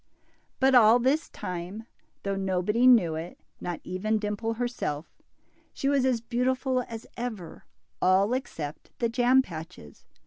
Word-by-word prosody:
But 265 0 +4
all 230 -2 +7
this 270 +6 +1
time, 180 +5 -6 0.4
though 200 0 -1
nobody 195 +5 +1
knew 215 -10 +6
it, 160 +2 -6 0.2
not 175 -2 -4
even 210 +4 -1
Dimple 210 +2 -2
herself, 225 -11 -4 0.5
she 275 - -2
was 280 -2 +2
as 250 -3 +1
beautiful 255 +2 0
as 225 -1 -8
ever, 220 -8 -6 0.4
all 195 +5 +4
except 155 - -5
the 235 - 0
jam 250 +2 +4
patches. 160 - -10
220 Hz, 135 wpm, -27 LUFS, 180-250 Hz, 0.5 s, all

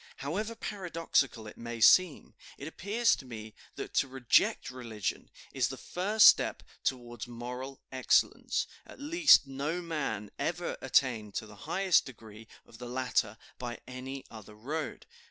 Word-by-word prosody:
However 205 +11 -3
paradoxical 165 - -1
it 105 - -11
may 120 0 -6
seem, 180 +7 +5 0.2
it 140 - -7
appears 210 +8 +1
to - - -10
me 110 -3 -8 0.2
that - - -7
to - - +3
reject 130 -1 +2
religion 115 -6 -4 0.2
is 130 -3 +1
the 130 - -6
first 205 - +2
step - - +5 0.2
towards 120 -3 -3
moral 125 +3 -7
excellence; 130 -1 +2 0.2
at - - -13
least 305 - +6
no 140 +5 -3
man 145 - -3
ever 175 +1 -2
attained 115 -6 +1
to - - -2
the 105 -1 -13
highest 190 -1 +3
degree 110 -3 -12 0.2
of 115 - -16
the 125 -1 -7
latter 125 -4 0 0.2
by 120 -1 -5
any 130 +1 -7
other 105 -1 -11
road. 145 +8 -5
130 Hz, 145 wpm, -31 LUFS, 115-165 Hz, 0.2 s, least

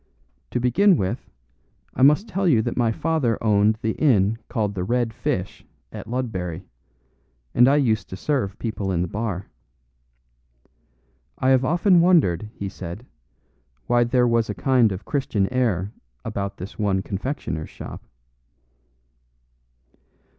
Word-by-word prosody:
"To - - -1
begin 170 - +4
with, 95 -1 -3 0.6
I - - -4
must 150 - +5
tell 195 -3 -1
you 120 -9 +4
that - - -3
my 120 -2 +2
father 140 -3 0
owned 105 0 +3
the 110 - +1
inn 110 -6 +2
called 105 -3 -1
the 90 -2 -3
'Red 120 +2 0
Fish' 95 -3 -3 0.3
at - - -8
Ludbury, 95 -9 -3 0.9
and 125 +1 +6
I 140 - +5
used 120 -7 +1
to 95 - -7
serve 125 -7 -1
people 105 -4 -3
in 85 -1 0
the - - -2
bar." 100 -1 -3 1.9
"I 130 - +1
have 130 -1 +4
often 175 +5 +4
wondered," 120 - +3
he 100 - -4
said, 95 +3 -8 0.8
"why 120 - +3
there 125 +1 +2
was 115 -1 +1
a 105 - -3
kind 120 +3 +3
of 95 +1 -4
a - - -25
Christian 110 -6 -1
air 105 -7 0 0.3
about 100 0 -4
this 95 +5 -9
one 95 -2 +1
confectioner's 100 - -4
shop." - - -9
115 Hz, 140 wpm, -23 LUFS, 100-130 Hz, 1.9 s, and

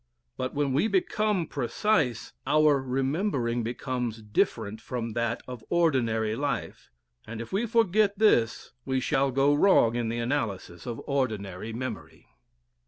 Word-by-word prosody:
But 130 +2 -4
when 140 -2 0
we 150 +11 +2
become 215 - +1
precise, 140 - 0
our 150 -2 +4
remembering 130 - -1
becomes 120 -1 -3
different 110 0 -1
from 115 -1 -4
that 115 +1 -2
of 125 -3 -8
ordinary 115 -10 +1
life, 140 - -3 0.4
and 110 0 -6
if 115 - -7
we 220 +5 +1
forget 210 -2 +2
this 120 - +2
we 130 -1 0
shall 135 +1 +1
go 135 +2 +3
wrong 145 - +5
in 120 -2 -1
the 115 - -2
analysis 115 -6 -3
of 115 -2 -4
ordinary 110 -7 -2
memory. 110 -10 -6
130 Hz, 135 wpm, -27 LUFS, 115-150 Hz, 0.4 s, wrong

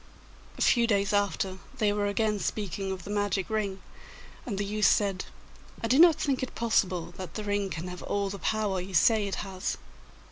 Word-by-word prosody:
A - - +1
few 235 -2 +4
days 200 -2 +1
after 195 -2 0 0.2
they 210 -4 +2
were 205 0 0
again 210 +1 0
speaking 195 -1 -3
of 185 -2 -5
the 205 - -7
magic 205 -1 -1
ring, 200 -3 -2 0.6
and 205 -5 -3
the 200 - -1
youth 210 -1 +2
said, 195 -2 +2 0.6
'I 230 - 0
do 260 +5 +4
not 335 -1 +8
think 280 -4 -1
it 260 - -4
possible 185 -7 0
that 185 -4 -7
the 215 - -3
ring 205 -1 -1
can 170 0 -5
have 180 0 -7
all 200 0 -1
the 200 - -6
power 210 -3 0
you 185 +1 -6
say 215 +4 +4
it 195 - -2
has. 190 0 -3
205 Hz, 200 wpm, -28 LUFS, 190-215 Hz, 0.6 s, not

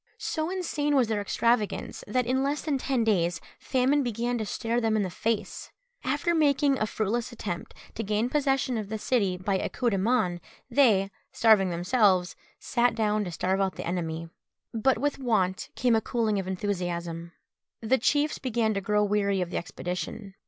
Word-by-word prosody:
So 315 0 -2
insane 310 -6 -1
was 250 -5 +3
their 215 -2 0
extravagance, 220 +1 0
that 250 +4 +1
in 260 +2 +1
less 285 +2 -1
than 290 -4 0
ten 260 -3 0
days 175 -6 +1 0.2
famine 265 +2 +2
began 240 0 -1
to 215 - -3
stare 230 +3 -1
them 225 -1 +1
in 210 - +2
the 185 - -3
face. 225 +4 -2 0.3
After 290 +6 0
making 285 -3 +3
a 215 - +1
fruitless 220 +4 -2
attempt 200 -7 -6 0.2
to - - -4
gain 215 +2 0
possession 270 -3 +1
of 205 -2 -6
the 220 - -2
city 205 -5 +1
by 190 +1 -1
a - - -2
coup 245 -2 0
de 195 - 0
main, 190 -5 +1 0.3
they, 215 -7 +4 0.2
starving 215 -5 +4
themselves, 180 +1 +2 0.2
sat 240 -1 +1
down 215 -1 +1
to 175 - -5
starve 190 +3 0
out 190 -1 0
the - - -6
enemy. 165 -2 -3 0.5
But 235 +4 +2
with 285 +3 -1
want 200 -8 0
came 245 -2 +3
a 220 - +2
cooling 220 -3 0
of 190 - -4
enthusiasm. 175 -3 -3 0.5
The 245 +4 +2
chiefs 295 +5 +1
began 230 -4 0
to 200 - -2
grow 210 +1 +2
weary 200 -1 +1
of 180 -1 -2
the - - -2
expedition. 180 +4 -5
220 Hz, 180 wpm, -27 LUFS, 195-255 Hz, 0.5 s, they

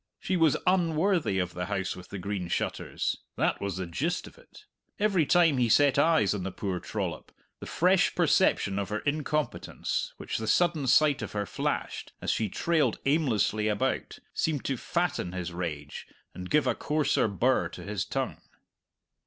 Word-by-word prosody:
She 190 - -1
was 165 -4 +4
unworthy 175 - +2
of 90 -1 -1
the 90 +1 -4
House 95 -2 -2
with 90 -1 -11
the 100 - -6
Green 95 -1 -3
Shutters - - -2 0.2
that - - +1
was 100 -2 -3
the 95 - -3
gist 150 - -2
of - - -13
it. - - -18 0.3
Every 195 -7 +2
time 165 -6 +4
he 120 -2 +2
set 140 +3 +4
eyes 145 - +4
on 100 - -3
the 95 +1 -3
poor 95 -1 -3
trollop, - - -4 0.3
the - - -8
fresh 180 +2 +3
perception 100 0 +2
of 100 -2 -3
her 105 0 -2
incompetence 150 +1 -2
which - - -4
the 110 - -4
sudden 165 +1 +2
sight 145 +2 +4
of 110 - -6
her 105 -1 -1
flashed, - - -3
as - - -1
she 110 -2 0
trailed 150 - +1
aimlessly 110 - +2
about, 105 -1 -1 0.2
seemed 155 -4 -1
to 135 - 0
fatten 170 - -1
his 90 -1 -4
rage 75 -5 -5 0.3
and 90 0 -7
give 150 -1 +3
a - - +2
coarser 150 -4 +1
birr 120 +6 +1
to - - -9
his 100 -3 -2
tongue. - - -3
125 Hz, 175 wpm, -28 LUFS, 95-160 Hz, 0.3 s, was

